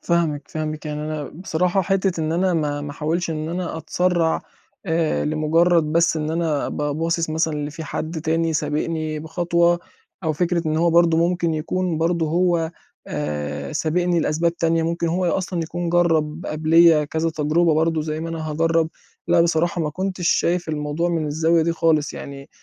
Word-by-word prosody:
فاهمِك، 165 -4 0
فاهمِك 155 0 -4
يعني 150 0 -4
أنا 155 -1 -3
بصراحة 180 +2 0
حتّة 190 -2 0
إن 155 +1 -1
أنا 180 +1 +1
ما 145 -3 -1
ما 145 0 -5
أحاولش 165 +4 -2
إن 155 0 -3
أنا 175 -1 -3
أتسرّع 170 +1 0 0.4
آآ، 160 -1 +1
لمجرّد 160 +2 +3
بس 170 0 +3
إن 155 0 -2
أنا 160 -3 0
أبقى 145 -1 -2
باصِص 165 +1 -1
مثلًا 160 0 0
اللي 150 0 -3
في 160 +1 -7
حد 160 +2 -4
تاني 165 +1 0
سابقني 155 +1 -2
بخطوة، 170 +1 +1 0.5
أو 160 - +1
فكرة 170 +2 0
إن 155 - 0
هو 170 +1 +3
برضه 165 -1 +4
ممكن 175 -2 0
يكون 170 +1 -1
برضه 165 0 +1
هو 170 0 +1 0.4
آآ، 75 -1 -4
سابقني 175 +1 +1
لأسباب 165 +3 0
تانية 165 0 +1
ممكن 170 +1 -1
هو 180 +2 0
أصلًا 180 -1 -1
يكون 175 +2 -4
جرّب 165 -2 +1
قبليّا 160 0 +4
كذا 160 +2 -1
تجربة 160 +1 +2
برضه 160 0 +1
زَي 155 0 -3
ما 165 - -4
أنا 160 -1 -4
هاجرّب، 165 +1 +1 0.4
لأ 175 0 +5
بصراحة 170 +2 +1
ما 155 -2 -1
كنتش 185 +1 -2
شايف 175 -1 +1
الموضوع 150 +2 -1
من 165 -3 -1
الزاوية 160 +2 +2
دي 165 +1 +1
خالص 160 -3 +1
يعني 140 0 -9
165 Hz, 170 wpm, -22 LUFS, 155-170 Hz, 0.5 s, لأ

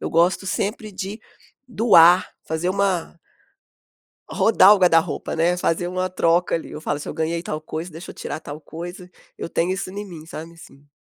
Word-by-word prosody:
eu - - -4
gosto 175 +4 +2
sempre 210 +3 -2
de 195 +3 -6 0.5
doar. 185 -6 +6 0.2
Fazer 160 +3 -2
uma 190 -4 0 1.1
rodar 205 -3 +6
o 205 - 0
guarda-roupa, 165 -3 +2
né. 170 +2 +2
Fazer 175 0 0
uma 185 +1 -2
troca, 175 0 +2
ali. 165 - -7
Eu - - -7
falo: 150 -2 -2
"Se - - -8
eu - - -5
ganhei 165 +1 -2
tal 155 -3 -4
coisa, 160 +3 -6
deixa 165 +3 -9
eu - - -11
tirar 155 - -6
tal 145 +1 -8
coisa." 175 +4 -9 0.3
Eu - - -5
tenho 170 +3 0
isso 190 -1 -4
em 205 +2 -6
mim, 165 -5 -11
sabe, 165 0 -8
assim. 145 -3 -16
175 Hz, 185 wpm, -22 LUFS, 165-185 Hz, 1.1 s, doar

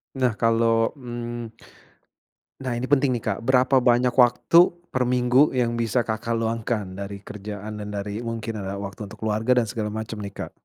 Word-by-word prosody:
Nah, 130 -2 +2
kalo, 115 +1 +2
mmm 120 -3 -6 1.1
nah 130 -3 -3
ini 130 +3 -4
penting 135 -2 +3
nih 115 - -3
Kak, 105 -3 -1
berapa 130 +1 +4
banyak 125 0 +3
waktu 125 +6 +5 0.3
per 130 - 0
minggu 125 +3 +4
yang 120 -2 +1
bisa 115 +1 +1
Kakak 110 +1 -2
luangkan, 110 -4 -2
dari 100 0 -5
kerjaan 105 +1 -7
dan 105 - -6
dari 100 +1 -4
mungkin, 115 -2 -4
eee, 100 +1 -4
waktu 100 +1 -6
untuk - - -12
keluarga 110 +4 +2
dan - - -3
segala 105 0 -3
macem 110 0 -5
nih, 100 0 -7
Kak? - - -6
115 Hz, 175 wpm, -24 LUFS, 105-125 Hz, 1.1 s, waktu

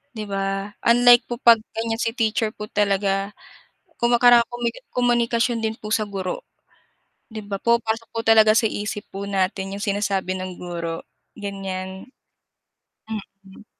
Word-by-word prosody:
'di 215 - -4
ba? 195 +1 -2 0.2
Unlike 245 +1 +6
po 240 - -3
'pag 230 -1 +7 0.2
ganiyan, 225 0 -2
si 230 0 -1
teacher 220 -1 0
po 210 0 -8
talaga. 200 0 0 0.6
Kung 240 0 +3
makara 240 0 +7
kumi 240 -1 -2 0.2
komunikasyon 240 -1 +1
din 220 0 -1
po 215 - -7
sa 215 - +1
guro. 195 - -4 0.9
'Di 215 -1 -6
ba 200 -1 -3
pumapasok 230 -1 0
po 225 - 0
talaga 220 -1 +6
sa 225 - +3
isip 210 0 -4
po 200 +1 -5
natin 195 0 -1
yung 205 - -5
sinasabi 195 -2 -1
ng 185 -1 -6
guro, 170 -2 -5 0.3
ganiyan. 190 0 -6 1.3
Mm. 195 +2 -15
210 Hz, 145 wpm, -22 LUFS, 195-230 Hz, 1.3 s, pag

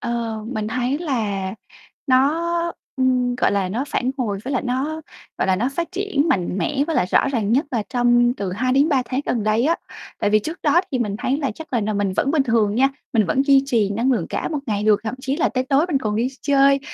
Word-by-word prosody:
Ờ, 235 -2 -3
mình 215 -3 -3
thấy 250 +4 -1
là 215 - -2 0.5
nó, 275 +5 +3 0.5
ừm, 255 -2 +1
gọi 250 - +2
là, 195 -2 0
nó 235 +9 -2
phản 255 +1 0
hồi 210 -5 -1
với 270 - -3
lại 265 - 0
nó, 275 +6 -2 0.4
gọi - - +1
là, 190 -1 +2
nó 235 +7 0
phát 335 +4 -2
triển 370 -6 0
mạnh 185 - 0
mẽ 285 +2 0
với 325 - -1
lại - - +2
rõ - - +3
ràng 225 -6 0
nhất 280 +6 +2
là 235 -4 0
trong 240 -1 +3
từ 195 -6 -4
2 255 +6 0
đến 280 +4 +4
3 275 -5 +2
tháng 255 +2 -2
gần 235 - 0
đây 215 +3 +2
á. 330 +3 +2 0.4
Tại 205 - +1
vì 215 - +5
trước 320 - -6
đó 310 +3 +4
thì 260 - 0
mình 210 -4 -1
thấy 265 +5 0
là 280 -3 -1
chắc 320 -2 -11
là 240 - +2
nà 215 +1 -1
mình 200 -2 0
vẫn 275 - +1
bình 300 -2 +3
thường 225 -5 +1
nha, 265 +4 +4 0.2
mình 220 -4 +3
vẫn 260 +11 +2
duy 275 -2 +6
trì 225 -7 +1
năng 235 +6 +1
lượng 240 - -1
cả - - -2
một 310 - -2
ngày 210 -3 -1
được, 215 -1 +4
thậm 220 - -3
chí 270 +1 -2
là 325 - +2
tới 255 0 -1
tối 275 +5 +2
mình 290 -6 +1
còn 215 -5 -2
đi 235 +3 +1
chơi 275 -1 +4
255 Hz, 250 wpm, -21 LUFS, 215-275 Hz, 0.5 s, duy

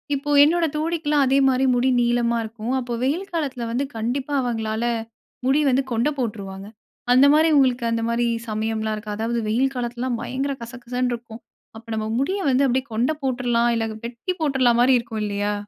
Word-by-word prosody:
இப்போ 285 +2 -5
என்னோட 335 +2 +3
தோழிக்கெல்லாம் 305 -3 +1
அதே 270 +1 +3
மாரி 260 +1 +2
முடி 250 +2 +2
நீளமா 235 0 +1
இருக்கும். 225 +3 -5
அப்போ 240 -1 -4
வெயில் 340 +9 -1
காலத்துல 270 -7 -2
வந்து 255 +4 0
கண்டிப்பா 260 +6 -2
அவங்களால 225 -2 -2 0.6
முடி 275 +3 +3
வந்து 265 +1 +2
கொண்டை 235 +6 +1
போட்டுருவாங்க. 200 -4 -4 0.5
அந்த 260 +2 +6
மாதிரி 315 +1 +4
உங்களுக்கு 255 -3 +2
அந்த 230 0 0
மாதிரி 235 +1 +1 0.2
சமயம்லாம் 220 0 -2
இருக்கா? 210 0 -6
அதாவது 230 +1 -1
வெயில் 265 +5 +1
காலத்திலலாம் 240 0 -3
பயங்கர 275 +2 -2
கசகசன்னு 245 +1 -3
இருக்கும். 230 -1 -8 0.4
அப்ப 225 +1 -14
நம்ம 215 0 -2
முடியை 380 +8 -1
வந்து 265 +2 +3
அப்படியே 260 +1 0
கொண்டை 245 +8 +1
போட்டுரலாம் 240 -2 +1
இல்ல 225 - 0 0.2
வெட்டி 235 +9 -4
போட்டுரலாம் 260 -5 +2
மாரி 255 +1 +5
இருக்கும் 225 -2 -5
இல்லயா? 205 0 -1
245 Hz, 170 wpm, -22 LUFS, 230-270 Hz, 0.6 s, அந்த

